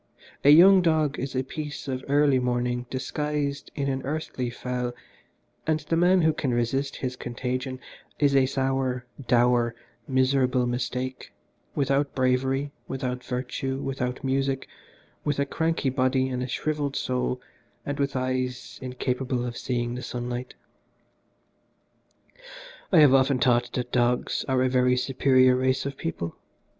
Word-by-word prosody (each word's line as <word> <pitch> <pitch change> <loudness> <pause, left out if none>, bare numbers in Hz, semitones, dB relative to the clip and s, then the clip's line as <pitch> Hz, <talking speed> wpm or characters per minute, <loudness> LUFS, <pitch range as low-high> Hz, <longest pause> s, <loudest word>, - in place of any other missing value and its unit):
A 140 - +6
young 185 +5 +8
dog 155 -4 +1
is 135 +1 -4
a 130 - +1
piece 150 +1 -6
of 130 -1 -3
early 140 -1 +4
morning 125 0 -1
disguised 145 +2 -2
in 140 -2 -1
an 135 -1 -1
earthly 140 -4 -3
fell, 125 0 -3 0.7
and 155 0 +1
the 155 +2 -1
man 180 +1 +4
who 160 0 +4
can 140 -4 -1
resist 130 +4 0
his 125 0 -3
contagion 130 +1 -4 0.4
is 140 -2 +3
a 135 -1 +5
sour, 130 -2 -1 0.2
dour, 120 -1 +3 0.3
miserable 130 -1 +2
mistake, 125 +1 -3 0.4
without 140 0 +1
bravery, 130 +2 +1 0.2
without 125 -2 -3
virtue, 130 +1 -3
without 130 -1 -3
music, 135 0 0 0.6
with 145 -2 0
a 140 - +1
cranky 160 -2 0
body 130 0 +1
and 125 -1 -2
a 125 - -2
shrivelled 145 +1 -2
soul, 125 0 -1 0.5
and 145 +1 -3
with 140 -1 0
eyes 130 -1 -2
incapable 125 0 -2
of 120 -1 -4
seeing 120 -1 -2
the 125 - -5
sunlight. 125 0 -5 2.4
"I 170 -5 +7
have 145 -3 +7
often 135 0 +4
thought 120 -1 +2
that 125 -1 -3
dogs 120 0 +1
are 130 -1 +2
a - - +3
very 125 0 +3
superior 130 0 +4
race 130 +1 +1
of 140 0 -3
people. 85 -6 -4
130 Hz, 140 wpm, -26 LUFS, 125-140 Hz, 2.4 s, young